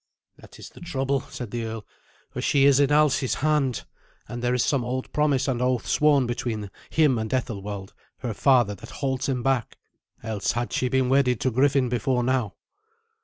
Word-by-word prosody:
"That - - -15
is - - -10
the - - -16
trouble," 135 -5 -1
said 125 -4 -7
the 120 -1 -3
earl, 110 -2 -6 0.5
"for - - -5
she 140 -1 +3
is 140 -1 +5
in 140 -1 +4
Alsi's 145 -3 +3
hand, 145 -5 0 0.4
and 120 0 -6
there 125 +1 +1
is 125 - +1
some 135 -4 +1
old 130 +2 -4
promise 145 -3 +1
and 125 -3 -1
oath 125 -1 0
sworn 145 -3 +3
between 115 -4 -4 0.2
him 150 -7 +3
and 110 0 -4
Ethelwald 105 -6 -4 0.3
her 120 -4 -3
father 120 -3 +3
that 110 +4 -11
holds 135 -1 -2
him 125 -2 -1
back. 135 -4 0 0.5
Else 110 -3 -2
had 120 0 -3
she 125 - 0
been 130 0 +1
wedded 130 -3 +2
to 130 - +1
Griffin 135 +1 +2
before 125 +1 0
now." 125 -4 0
125 Hz, 185 wpm, -25 LUFS, 120-135 Hz, 0.5 s, is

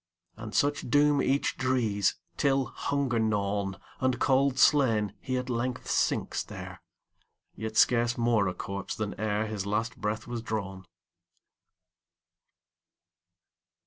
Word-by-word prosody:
And 110 -1 -8
such 145 -2 +1
doom 145 +2 +4
each 135 +2 0
drees, 115 -7 +1 0.2
Till, 135 -1 +2
hunger 135 -2 -1
gnawn, 100 -3 0 0.2
And 130 -2 +1
cold 135 0 +3
slain, 115 - +4
he 130 -1 -2
at 125 0 -3
length 125 0 -2
sinks - - +1
there, - - -9 0.7
Yet 110 0 -5
scarce 120 0 +4
more 115 -4 +2
a 90 - -3
corpse 100 0 -5
than 105 -2 -3
ereHis 105 -1 -1
last 110 +4 -1
breath 110 +1 -3
was 120 -1 -4
drawn. 100 -4 -5
115 Hz, 115 wpm, -28 LUFS, 105-130 Hz, 0.7 s, doom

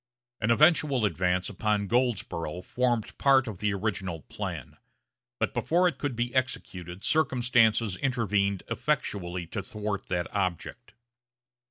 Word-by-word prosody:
An 105 - 0
eventual 145 -2 +4
advance 90 -1 0
upon 105 -1 0
Goldsboro' 95 -8 -1
formed 120 0 -1
part 135 -2 +5
of 105 -5 -6
the 105 0 +1
original 95 -5 -2
plan; - - -6 0.6
but, - - -1
before 180 +2 +2
it 175 - -2
could 145 -4 -2
be 120 +1 -2
executed, 95 -8 -3
circumstances 120 -8 +2
intervened 105 -7 0
effectually 90 -3 -2
to 100 +5 -4
thwart 105 0 -4
that 90 -2 -1
object. 95 -4 -3
105 Hz, 125 wpm, -28 LUFS, 95-125 Hz, 0.6 s, part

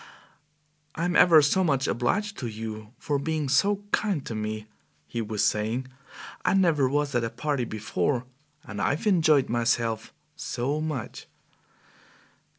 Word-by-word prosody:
"I'm 175 +2 -1
ever 160 -4 +7
so 190 +7 +3
much 140 -6 +1
obliged 200 - 0
to 125 - -3
you 110 -1 -7
for 145 -3 -1
being 155 0 -1
so 200 +8 +2
kind 195 -10 0
to - - -5
me!" 110 0 -4 0.4
he 95 +10 -4
was 110 -1 0
saying; 115 +5 -1 0.5
"I - - +2
never 160 -8 +3
was 145 0 0
at 120 -1 +1
a 115 - -1
party 130 +2 -2
before, 115 +4 -1 0.4
and 105 -1 -6
I've 145 - 0
enjoyed 155 -9 +4
myself 115 -1 0 0.2
so 140 +5 -2
much!" 155 -7 -5
135 Hz, 140 wpm, -26 LUFS, 115-155 Hz, 0.5 s, ever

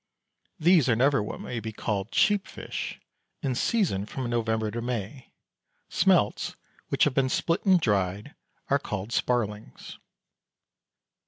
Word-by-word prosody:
These 170 -5 +4
are 115 - +4
never 135 0 +3
what 105 - -5
may 120 - -4
be 110 0 -5
called 105 -1 -3
cheap 205 - +2
fish. - - -6 0.4
In 135 - 0
season 125 - 0
from 130 +2 -4
November 110 -2 0
to 120 - -4
May. 120 +1 -5 0.6
Smelts - - +2 0.3
which - - +2
have 150 - +3
been 130 0 +2
split 165 +5 0
and 185 -2 +6
dried 100 - 0 0.4
are - - +4
called 100 +4 -5
sparlings. 105 - -2
120 Hz, 135 wpm, -27 LUFS, 105-140 Hz, 0.6 s, and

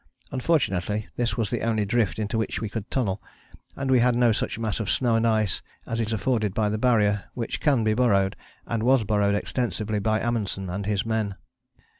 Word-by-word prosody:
Unfortunately, 110 - 0
this 120 0 -1
was 110 -5 -1
the - - -1
only 110 -2 +1
drift 110 0 +1
into 110 +1 -2
which 110 -1 -1
we 110 - -3
could 110 -1 -5
tunnel, 105 -7 -1 0.5
and 135 -1 -2
we 130 - +6
had 125 0 +3
no 120 -1 +4
such 105 - -1
mass 110 -2 -2
of 105 -4 -2
snow 120 +2 +2
and 115 +1 +2
ice 110 -3 +1 0.2
as 115 0 -2
is 110 0 -2
afforded 110 -3 0
by 105 -1 +2
the 105 +1 -2
Barrier, 105 -5 +2
which 115 -2 -3
can 135 -6 +2
be 110 0 +2
burrowed, 100 -5 +2 0.3
and 115 -2 -2
was 125 0 +4
burrowed 100 -1 +2
extensively 110 -1 -1
by 110 +1 +1
Amundsen 100 -5 -2
and 100 +2 -4
his 105 -1 0
men. 110 -3 -1
110 Hz, 200 wpm, -25 LUFS, 105-120 Hz, 0.5 s, we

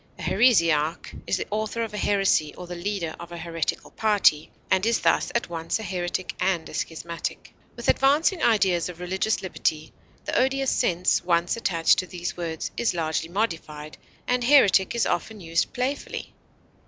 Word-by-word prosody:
A - - -9
heresiarch 165 -9 +2
is - - +1
the - - -3
author 215 +2 -2
of 225 - -5
a - - -4
heresy 195 -7 +2
or 180 - -8
the 175 - -7
leader 175 -2 -3
of 170 - -9
a 170 - -6
heretical 165 -1 -3
party, 205 -8 +2 0.2
and 190 0 +3
is 230 +1 +2
thus - - +2
at 235 - 0
once 165 -1 -2
a 220 - -7
heretic 180 -1 -3
and 180 -3 0
a - - -11
schismatic. 170 +1 -5 0.2
With - - -7
advancing 305 +6 +3
ideas 190 -6 +2
of 175 -1 -10
religious 190 +4 -1
liberty, 155 -4 -2 0.3
the - - -3
odious 270 +1 +2
sense 180 -6 +1
once 175 0 +1
attached 170 -8 +2
to 185 - -3
these 175 0 -5
words 165 -2 -4
is 235 -6 0
largely 165 0 -1
modified, 160 -6 -3 0.3
and 250 0 +1
heretic 240 -7 +5
is 235 - +2
often 220 -1 -2
used 165 -2 -1
playfully. 265 +3 -4
180 Hz, 170 wpm, -25 LUFS, 170-220 Hz, 0.3 s, heretic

